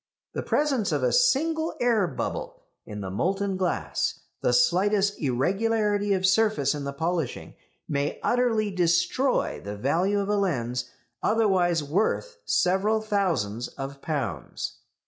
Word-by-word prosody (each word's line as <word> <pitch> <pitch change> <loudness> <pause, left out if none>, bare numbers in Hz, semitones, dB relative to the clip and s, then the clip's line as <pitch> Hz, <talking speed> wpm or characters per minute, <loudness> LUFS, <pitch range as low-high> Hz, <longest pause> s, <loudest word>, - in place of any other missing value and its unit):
The - - -2
presence 275 -8 +1
of - - 0
a - - +2
single 325 - +2
air 230 -6 +3
bubble 140 - -5 0.2
in 105 -1 -6
the 95 -1 -5
molten 195 - 0
glass, 185 -2 -1 0.2
the - - +2
slightest 205 - +2
irregularity 205 - +1
of 190 -1 +1
surface 195 -7 +3
in 145 -2 -5
the 140 - -2
polishing 165 0 -3 0.3
may 145 0 -1
utterly 225 -4 +1
destroy 175 +8 +1
the 100 +1 -6
value 175 - +1
of 200 - -1
a 210 0 +1
lens 125 -10 -1 0.3
otherwise 190 -7 +2
worth 215 - -1
several 195 +5 +2
thousands 170 - -1
of 135 0 -7
pounds. 120 - -4
190 Hz, 130 wpm, -26 LUFS, 145-215 Hz, 0.3 s, air